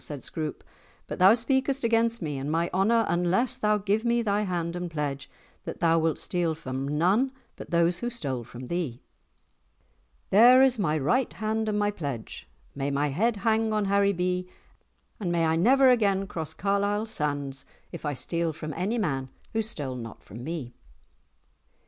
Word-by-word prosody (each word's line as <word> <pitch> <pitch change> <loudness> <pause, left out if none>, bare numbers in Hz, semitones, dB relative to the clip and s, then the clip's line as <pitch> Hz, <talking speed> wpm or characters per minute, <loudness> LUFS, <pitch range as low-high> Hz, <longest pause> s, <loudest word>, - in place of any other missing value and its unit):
said 145 -4 -7
Scroope; 155 -2 -5 0.4
"but - - -6
thou 190 +4 +7
speakest 265 +2 0
against 230 -2 +1
me 145 -3 -3
and 140 +3 -3
my 165 +2 0
honour 220 +5 +3
unless 180 +8 +1
thou 210 0 +2
give 205 +2 0
me 235 0 +2
thy 205 -1 +1
hand 175 -4 -2
and 175 0 -4
pledge 145 -3 -4 0.3
that - - -6
thou 165 0 +3
wilt 160 -1 +1
steal 170 -3 -1
from 135 -3 -4
none 185 - +2 0.2
but - - -10
those 170 +1 +2
who 240 - -2
stole 140 - -3
from 125 +2 -10
thee." 150 -5 -3 1.3
"There 245 +6 +8
is 255 -3 +3
my 155 -6 +1
right 235 - +1
hand 220 0 -1
and 210 0 0 0.2
pledge! 140 -8 -6 0.2
May 140 0 -2
my 145 +1 0
head 215 - +1
hang 220 0 +2
on 210 -1 +1
Haribee, 185 -2 +1 0.7
and 185 -5 -2
may 170 -1 +2
I 160 0 +2
never 255 +9 +5
again 200 -5 +2
cross 160 -4 -5
Carlisle 200 +2 0
sands 145 -9 -3 0.3
if - - -8
I 145 -2 -2
steal 170 +4 -1
from 155 -1 -6
any 200 - -1
man 135 - -1 0.2
who 225 - +1
stole 150 - -4
not 115 -2 -9
from 115 +5 -10
me." 145 -5 -5
180 Hz, 170 wpm, -27 LUFS, 150-220 Hz, 1.3 s, There